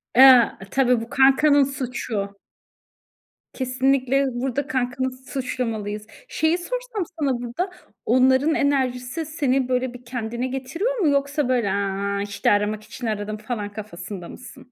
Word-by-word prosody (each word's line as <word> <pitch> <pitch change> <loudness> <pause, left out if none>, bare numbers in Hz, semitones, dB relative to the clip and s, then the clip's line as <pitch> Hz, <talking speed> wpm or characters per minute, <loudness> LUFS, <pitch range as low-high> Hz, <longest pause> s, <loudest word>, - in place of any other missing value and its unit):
A, 255 -2 +9 0.2
tabii 250 -3 +3
bu 230 - -8
kankanın 280 +2 +5
suçu. 240 -7 -4 1.1
Kesinlikle, 265 +1 +1
burada 265 +3 -2
kankanı 260 -2 -1
suçlamalıyız. 240 -5 -4 0.2
Şeyi 315 +2 +1
sorsam - - -4 0.2
sana 270 -5 0
burada, 245 +11 -3 0.4
onların 260 +5 +4
enerjisi 265 +1 0
seni 275 -5 0
böyle 250 0 0
bir 245 0 -12
kendine 240 0 -3
getiriyor 270 - -2
mu? 360 - +3
Yoksa 280 0 0
böyle, 240 -5 +2
"Aaa, 200 0 -1
işte, 200 0 0
aramak 210 +1 +1
için 230 +2 -7
aradım." 215 0 -3
falan 215 -2 -5
kafasında 195 -3 -7
mısın? 250 0 -12
255 Hz, 125 wpm, -23 LUFS, 220-275 Hz, 1.1 s, A